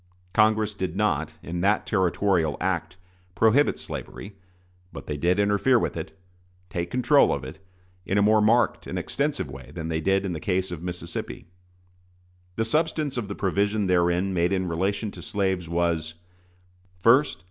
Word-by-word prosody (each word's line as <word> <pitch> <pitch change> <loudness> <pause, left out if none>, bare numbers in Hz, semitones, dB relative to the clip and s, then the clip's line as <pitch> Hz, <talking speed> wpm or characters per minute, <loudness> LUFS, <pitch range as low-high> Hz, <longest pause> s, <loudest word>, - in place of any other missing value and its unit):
Congress 110 0 +3
did 95 -4 -4
not, 80 -7 0
in 85 +1 -4
the 100 +3 +3
Territorial 95 -5 +1
Act, 85 -1 -2 0.4
prohibit 115 +6 +3
slavery; 100 0 -7 0.6
but - - -9
they 75 - -3
did 85 +5 +1
interfere 105 +5 +3
with - - -1
it 85 +3 -7 0.5
take 85 -4 -3
control 130 +5 +4
of - - -2
it - - -9 0.4
in 95 +2 -1
a - - +4
more 110 +1 +4
marked 115 +3 +2
and - - -4
extensive 145 - -2
way 65 -1 -10
than 80 -1 -4
they 80 -1 -1
did 95 +3 +1
in 95 - -2
the 80 - -4
case 95 0 -1
of 85 -3 -6
Mississippi. 90 0 -6 1.1
The 110 - 0
substance 155 +2 0
of 120 -5 -3
the 100 - -5
provision 100 +2 0
therein 90 +1 +2
made 85 0 +1
in 95 -1 0
relation 100 +5 -1
to - - -10
slaves 95 -4 -1
was: 85 -2 -1 0.9
1st. 130 +6 +4
95 Hz, 160 wpm, -25 LUFS, 85-105 Hz, 1.1 s, control